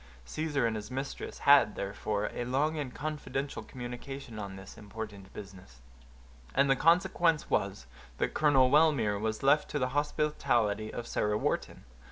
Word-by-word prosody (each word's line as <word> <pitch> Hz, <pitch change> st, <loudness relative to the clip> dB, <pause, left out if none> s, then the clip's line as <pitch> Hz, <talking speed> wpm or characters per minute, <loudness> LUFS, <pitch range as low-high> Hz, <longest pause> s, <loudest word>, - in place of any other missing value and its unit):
Caesar 145 Hz, -, -1 dB
and 115 Hz, -1 st, 0 dB
his 105 Hz, 0 st, -6 dB
mistress 135 Hz, +2 st, -5 dB
had, 140 Hz, -6 st, +6 dB
therefore, 100 Hz, +1 st, -2 dB
a -, -, -3 dB
long 140 Hz, +6 st, 0 dB
and 145 Hz, -5 st, -4 dB
confidential 145 Hz, -2 st, -4 dB
communication 125 Hz, -1 st, -7 dB
on 100 Hz, -2 st, -6 dB
this 95 Hz, 0 st, -11 dB
important 105 Hz, -2 st, -8 dB
business; 95 Hz, -11 st, -11 dB, 0.8 s
and 140 Hz, -, +4 dB
the -, -, +5 dB
consequence 170 Hz, 0 st, +3 dB
was, 100 Hz, -7 st, 0 dB, 0.3 s
that -, -, -1 dB
Colonel 135 Hz, -4 st, +4 dB
Wellmere 140 Hz, -10 st, +4 dB
was 110 Hz, +2 st, -2 dB
left 145 Hz, +2 st, +4 dB
to -, -, -2 dB
the 125 Hz, -2 st, 0 dB
hospitality 125 Hz, -7 st, 0 dB
of 120 Hz, -, -5 dB
Sarah 105 Hz, -2 st, 0 dB
Wharton. -, -, -2 dB
125 Hz, 150 wpm, -30 LUFS, 105-145 Hz, 0.8 s, had